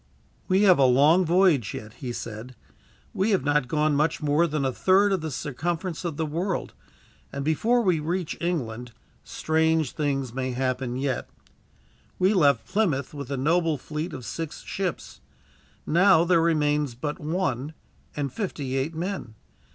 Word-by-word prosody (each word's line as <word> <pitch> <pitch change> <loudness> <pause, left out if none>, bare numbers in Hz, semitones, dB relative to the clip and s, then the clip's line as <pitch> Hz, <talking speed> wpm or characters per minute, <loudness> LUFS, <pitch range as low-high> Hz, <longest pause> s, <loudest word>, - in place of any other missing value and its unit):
"We 190 +2 +3
have 185 -6 +6
a 135 - +6
long 145 +8 +5
voyage 170 - +3
yet," 105 +1 -8
he 125 0 -6
said. 115 +1 -7 0.6
"We 195 +4 0
have 195 -10 +2
not 145 -2 +1
gone 150 +2 +1
much 150 +3 +1
more 150 +3 +2
than 150 -3 -1
a 130 - +1
third 190 +9 +3
of 190 - 0
the 160 - -3
circumference 165 +6 -3
of 165 -4 -4
the 160 - -1
world 175 +5 -3 0.6
and, 140 0 -4
before 230 +11 +2
we 180 -6 +2
reach 170 +2 -2
England, 125 -9 -3 0.3
strange 160 -2 0
things 135 -5 -2
may 130 0 -2
happen 130 -1 -2
yet. 130 -1 -2 0.9
We 185 +3 +3
left 145 -8 +3
Plymouth 175 -11 0
with 140 -3 -7
a 140 - -2
noble 165 +3 +1
fleet 155 +5 -5
of 125 - -8
six 160 +7 -6
ships. 185 -5 -4 0.6
Now 175 +1 +5
there 170 -1 +3
remains 150 -5 +1
but 145 +4 -4
one, 150 -3 -2 0.4
and 145 -2 -3
fifty 150 - -3
eight 140 +5 -2
men. 170 - -4
150 Hz, 160 wpm, -25 LUFS, 135-175 Hz, 0.9 s, have